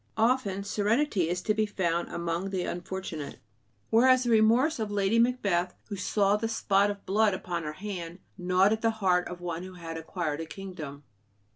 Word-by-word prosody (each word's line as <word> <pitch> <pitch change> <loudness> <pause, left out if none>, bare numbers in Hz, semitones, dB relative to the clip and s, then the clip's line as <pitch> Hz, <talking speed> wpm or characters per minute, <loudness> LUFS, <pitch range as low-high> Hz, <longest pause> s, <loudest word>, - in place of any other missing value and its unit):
Often 220 -4 +1
serenity 210 - +1
is 180 +1 -2
to 215 - +2
be 215 0 +1
found 175 -4 -1
among 170 +2 -2
the 190 -2 -2
unfortunate, 175 -4 -5 0.5
whereas 255 +2 +5
the 240 - 0
remorse 230 +7 +4
of 215 -2 -2
Lady 205 +2 +2
Macbeth, 200 -8 +1
who 205 - -3
saw 200 +1 +2
the 225 +2 -2
spot 205 -2 +2
of 205 -1 -6
blood 205 +1 +3
upon 175 -2 -4
her 150 -1 -5
hand, 180 -2 -6 0.2
gnawed 185 +2 +3
at 220 - -3
the 230 - +3
heart 180 -3 +2
of 175 0 -8
one 170 -1 -4
who 185 0 -9
had 165 -2 -7
acquired 160 -2 -3
a 165 - -6
kingdom. 160 -7 -8
195 Hz, 180 wpm, -28 LUFS, 175-215 Hz, 0.5 s, whereas